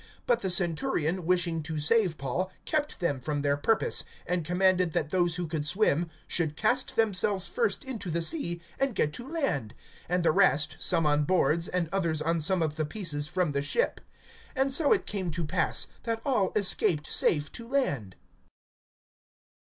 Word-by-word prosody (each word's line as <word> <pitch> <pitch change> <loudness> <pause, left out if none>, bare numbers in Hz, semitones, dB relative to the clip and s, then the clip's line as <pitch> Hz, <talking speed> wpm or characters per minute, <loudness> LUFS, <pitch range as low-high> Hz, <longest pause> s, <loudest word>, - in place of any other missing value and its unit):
(43)But 240 -1 +3
the 195 - -2
centurion, 175 - +1
wishing 175 -2 +1
to 155 +1 -5
save 180 +2 +2
Paul, 170 +8 -3
kept 300 -1 -2
them 145 -6 -1
from 145 +1 -3
their 145 0 +2
purpose; 210 +9 +2 0.2
and 180 -1 -1
commanded 180 0 +2
that 155 -3 -1
those 175 -2 +1
who 175 0 -3
could 155 -2 -3
swim 175 -1 +2 0.2
should 160 -3 -1
cast 245 +4 0
themselves 200 -3 +2
first 470 -9 -1
into 230 -9 -5
the 170 +1 0
sea 175 - -1 0.2
and 270 -4 0
get 150 -5 0
to 240 +8 -7
land, 140 - -2 0.3
(44)and 180 0 +1
the 165 - +4
rest, 150 -1 +3
some 165 -3 +2
on 150 0 +2
boards, 170 -1 +2
and 180 -2 -1
others 170 -5 0
on 165 +2 0
some 170 +3 +1
of 155 0 -3
the 155 - 0
pieces 150 -4 -1
from 180 -1 -1
the 140 0 -1
ship. 475 - -1 0.5
And 270 +1 +1
so 290 +1 +3
it 410 - +3
came 190 -4 -2
to 170 0 -3
pass, 150 - 0 0.2
that 230 -1 -2
all 230 -9 +1
escaped 180 -6 +1
safe 150 -2 +2
to 230 - -9
land. 145 - -1
175 Hz, 175 wpm, -28 LUFS, 155-205 Hz, 0.5 s, the